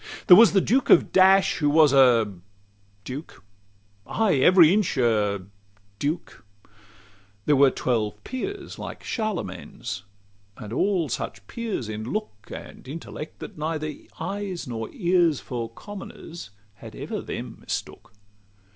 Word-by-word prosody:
LXXXV - - -25
There 180 - +11
was 230 +1 +7
the 195 - +4
Duke 255 +8 +1
of - - +6
Dash, 190 +1 +5
who 145 -2 +2
was 150 -2 +5
a 120 -6 +5 0.7
duke, 135 +3 -8 0.6
"Ay, 215 -9 +1
every 175 +4 +6
inch 200 -7 +1
a" 105 -6 +1 0.5
duke; 155 +4 -3 1.0
there 150 - +4
were 140 0 +6
twelve 105 -5 -2
peers 380 +9 -6
Like - - -7
Charlemagne's 215 - -4 0.6
and 105 +1 -8
all 185 +2 +1
such 125 - -5
peers 225 - -4
in 110 0 -5
look 160 - -5
And - - -10
intellect, 155 +1 -8
that - - -9
neither 155 -1 -2 0.3
eyes 200 -3 -4
nor 115 -2 -4
ears 175 -5 +2
For 120 -2 -5
commoners 170 - -10 0.3
had - - -11
ever - - -5
them - - -6
mistook. 115 +1 -6
155 Hz, 130 wpm, -25 LUFS, 120-195 Hz, 1.0 s, There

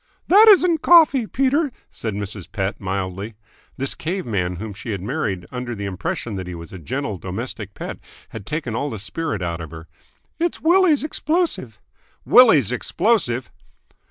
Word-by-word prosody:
"That 420 +5 +8
isn't 360 -6 +5
coffee, 310 -9 +6
Peter," 275 +5 +1 0.2
said 110 -3 -4
Mrs. 100 -2 -6
Pett 95 +1 -2
mildly. 95 +2 -4 0.4
This 135 +1 -1
cave 180 +3 -4
man 90 -6 -1
whom 105 +3 -6
she 110 +3 -6
had 95 - -4
married 100 - -2
under 125 -1 -4
the 100 -1 -5
impression 100 +4 -4
that 95 -1 -5
he 90 - -6
was 85 0 -10
a 95 - -7
gentle 120 - -4
domestic 100 +1 -6
pet - - -6 0.3
had 110 -4 -9
taken 150 -6 -3
all 140 +5 -1
the 110 - -5
spirit 110 - -4
out 85 -1 -3
of 80 - -7
her. 80 0 -10 0.5
"It's 345 0 -1
Willie's 340 -3 +4
explosive." 325 +3 -1 0.5
"Willie's 160 - +6
explosive?" 130 - 0
120 Hz, 160 wpm, -21 LUFS, -, 0.5 s, That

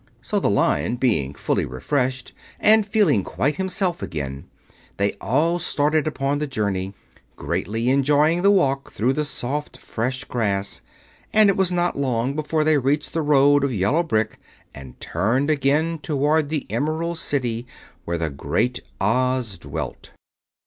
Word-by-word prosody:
So, - - -1
the - - +1
Lion 80 +11 +1
being 100 - 0
fully - - 0
refreshed, 125 - -2 0.3
and 215 -1 +5
feeling 200 - +3
quite 145 - -1
himself 190 -2 -1
again, 70 -3 -5 0.5
they 100 0 +1
all 155 - +1
started 155 -2 +1
upon 145 -1 -1
the 150 - -2
journey, 100 -6 -2 0.4
greatly 115 +5 -2
enjoying 145 +5 +3
the 200 - +5
walk 140 -9 +2
through 125 +5 +1
the 150 - 0
soft, 145 +1 -4
fresh 125 +3 -3
grass; 100 -4 -2 0.5
and 215 -2 +6
it - - -3
was 190 -2 +2
not 175 -3 0
long 130 -1 0
before 155 +1 0
they 155 -1 +3
reached 140 +3 -1
the 165 - 0
road 145 -1 +4
of 140 - +1
yellow 110 - +1
brick 110 -10 -1 0.3
and 65 -2 -12
turned 120 - 0
again 155 +3 +1
toward 150 +1 +1
the 155 -2 -2
Emerald 160 +3 -1
City 120 -4 -2 0.4
where 85 0 -2
the 80 -2 -2
Great 120 - -1 0.2
Oz 125 -2 0
dwelt. - - -6
135 Hz, 150 wpm, -22 LUFS, 110-155 Hz, 0.5 s, and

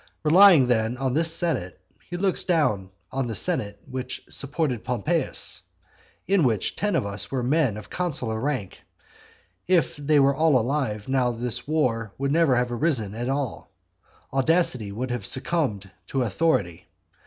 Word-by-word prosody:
Relying 170 -2 +7
then 120 0 0
on 130 -1 -1
this 165 +3 +4
senate, 165 - -1 0.3
he 175 - -4
looks 190 0 0
down 125 - +1 0.2
on 135 -1 -2
the 115 - -4
senate 100 +1 -1
which 130 0 -6
supported 140 -4 -1
Pompeius, 120 -4 0 0.6
in 195 -3 +2
which 110 -7 0
ten 205 0 -1
of - - 0
us 100 0 -5
were 130 -2 -2
men 130 -4 +1
of 105 - -11
consular 135 -11 -1
rank; 130 -7 -3 0.9
and 185 0 +5
if 165 - -1
they 145 +1 +2
were 140 0 +4
all 155 -1 +3
alive 120 -4 -2
now 130 -2 +1
this 120 +1 -3
war 115 -9 0
would 140 +1 -1
never 160 -4 +3
have 125 0 0
arisen 120 -6 0
at 120 +3 -4
all. 135 -3 -3 0.6
Audacity 135 - +2
would 125 +5 -4
have 125 - -3
succumbed 130 - -1 0.2
to 135 -2 -1
authority. 95 - -1
130 Hz, 155 wpm, -24 LUFS, 110-155 Hz, 0.9 s, Relying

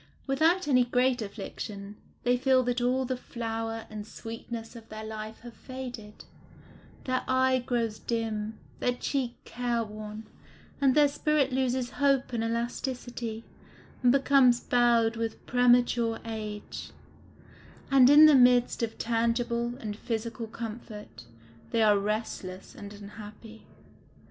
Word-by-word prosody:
Without 315 +6 +2
any 255 -3 +5
great 250 0 +1
affliction, 200 0 -7 0.3
they 245 0 +3
feel 260 0 +3
that 245 0 -1
all 255 +2 +1
the 255 +1 -1
flower 225 -2 -4
and 210 -1 -8
sweetness 230 +1 -7
of 225 -1 -12
their 215 0 -7
life 220 0 -7
have 240 0 -10
faded; 250 -6 -9 0.8
their 255 0 0
eye 260 0 +3
grows 230 -3 -1
dim, 220 -2 -3 0.2
their 245 - +1
cheek 250 -1 -2
care 240 -1 -1
worn, 215 0 -8 0.6
and 270 -2 +4
their 295 -1 +6
spirit 290 -1 +1
loses 255 -1 0
hope 275 -3 +2
and 230 -1 0
elasticity, 235 0 -3 0.6
and 250 -1 +5
becomes 270 -2 +5
bowed 235 -2 +3
with 225 -1 -4
premature 245 -2 +3
age; 215 -2 -6 1.0
and 265 -2 +7
in 295 +2 +9
the 305 - +8
midst 245 -2 +5
of 230 -1 -2
tangible 235 +1 0
and 215 -4 -5
physical 230 +1 -4
comfort, 215 - -8 0.4
they 225 - +2
are 210 -2 +5
restless 200 -3 -4
and 205 -1 -9
unhappy. 210 +2 -11
235 Hz, 130 wpm, -28 LUFS, 220-255 Hz, 1.0 s, in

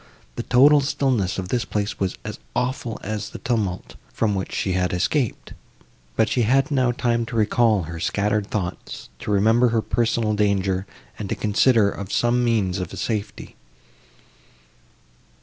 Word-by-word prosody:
The - - -3
total 145 +4 +5
stillness 130 -8 0
of 95 -1 -4
this 120 +1 0
place 105 -1 -3
was 95 -2 -1
as - - -6 0.2
awful 125 -2 -2
as 110 +1 -4
the - - -8
tumult, 105 - -2 0.2
from 110 -2 0
which 95 -1 -3
she 95 - -1
had 90 0 0
escaped: 120 - -1 0.6
but 110 - +3
she 125 - 0
had 135 +6 +2
now 130 -3 +2
time 120 -1 0
to 120 - -6
recall 110 -2 +3
her 85 +1 -7
scattered 105 +3 0
thoughts, 90 -6 -5
to - - -7
remember 110 +4 +4
her 115 -2 +1
personal 115 -2 0
danger, 100 -2 0 0.3
and 100 -2 -5
to - - -1
consider 110 +1 +3
of 100 0 -7
some 120 +1 +2
means 100 -6 +1
of 90 -3 -4
safety. 105 -3 -4
110 Hz, 155 wpm, -23 LUFS, 100-120 Hz, 0.6 s, total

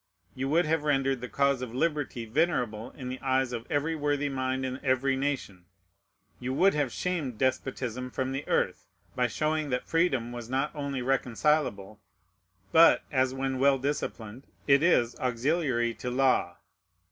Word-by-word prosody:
You 135 +1 -3
would 165 +3 +3
have 160 0 +1
rendered 135 -3 +1
the 125 - -6
cause 140 -2 +1
of 125 -2 -6
liberty 145 -5 -1
venerable 120 -4 0
in 130 -2 -9
the 130 - -6
eyes 130 -1 +1
of 115 0 -5
every 155 +2 0
worthy 145 -1 0
mind 130 -1 -2
in 130 0 -5
every 135 +1 +2
nation. 130 -10 -3 0.7
You 130 +1 -3
would 195 +6 +4
have 145 -4 0
shamed 160 -10 -2
despotism 125 -1 -2
from 130 +1 -2
the 135 +2 -4
earth, - - 0 0.3
by 125 -1 +2
showing 155 +3 -1
that 125 -1 -1
freedom 140 -8 +1
was 120 -1 -7
not 135 +3 -1
only 140 -3 -3
reconcilable, 120 -5 0 0.7
but, 165 +1 +6
as, 130 -2 +1
when 135 -1 -2
well 140 0 +4
disciplined, 130 -3 -4 0.2
it 140 0 +5
is, 125 -8 +3
auxiliary 125 -1 0
to 110 +3 -5
law. 125 -9 +1
130 Hz, 160 wpm, -28 LUFS, 125-145 Hz, 0.7 s, but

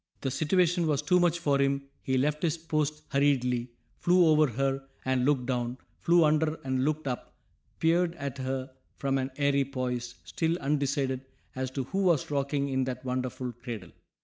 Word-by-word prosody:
The 135 - -1
situation 170 +4 +2
was 150 -1 +1
too 180 +5 +4
much 175 -1 +3
for 145 -5 +1
him; 140 0 +1 0.2
he 130 -2 0
left 150 +3 +1
his 170 -2 +1
post 155 -2 -1
hurriedly, 125 -4 +2 0.3
flew 180 0 +5
over 155 -1 +5
her 135 +2 -1 0.2
and 130 -1 +1
looked 135 -3 +2
down, 125 -1 -1 0.2
flew 170 -1 +4
under 155 +1 +2
and 130 -1 0
looked 155 0 -1
up, 125 -2 -4 0.4
peered 170 +1 +2
at 140 -3 -5
her 130 0 -3 0.3
from 135 -1 0
an 130 0 -2
airy 140 -1 +3
poise, 125 -3 -3
still 165 +1 -1
undecided 140 -3 -1 0.3
as 130 0 -2
to 130 +1 -3
who 190 +10 -3
was 170 -7 +2
rocking 140 0 0
in 130 -1 +1
that 125 0 -5
wonderful 125 0 -2
cradle. 115 -6 -8
140 Hz, 175 wpm, -29 LUFS, 130-155 Hz, 0.4 s, flew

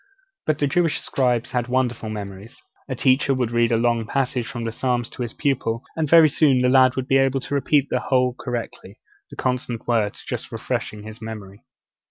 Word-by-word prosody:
But 155 -2 +2
the 145 - +1
Jewish 165 +3 +1
scribes 125 -3 0
had 125 -1 -1
wonderful 125 -3 -1
memories. 105 +3 -8 0.3
A 130 - -2
teacher 135 +2 +2
would 125 -3 -1
read 120 0 +2
a 115 - +3
long 115 -1 +1
passage 125 -2 -1
from 120 -3 -5
the 115 - -2
Psalms 120 0 -1
to - - -8
his 120 -2 -4
pupil, 130 -4 -1
and 155 -3 -1
very 165 0 +8
soon 140 -3 +3
the 125 - +4
lad 130 -1 +5
would 130 -1 -3
be 135 0 +4
able 135 0 +2
to 145 - -6
repeat 140 0 +2
the 125 - +1
whole 125 -1 +1
correctly, 120 -2 -6 0.3
the - - -11
consonant 125 -2 -3
words 110 -4 0
just - - -5
refreshing 105 -1 -4
his 110 +1 -10
memory. 105 -3 -9
125 Hz, 200 wpm, -22 LUFS, 115-135 Hz, 0.3 s, very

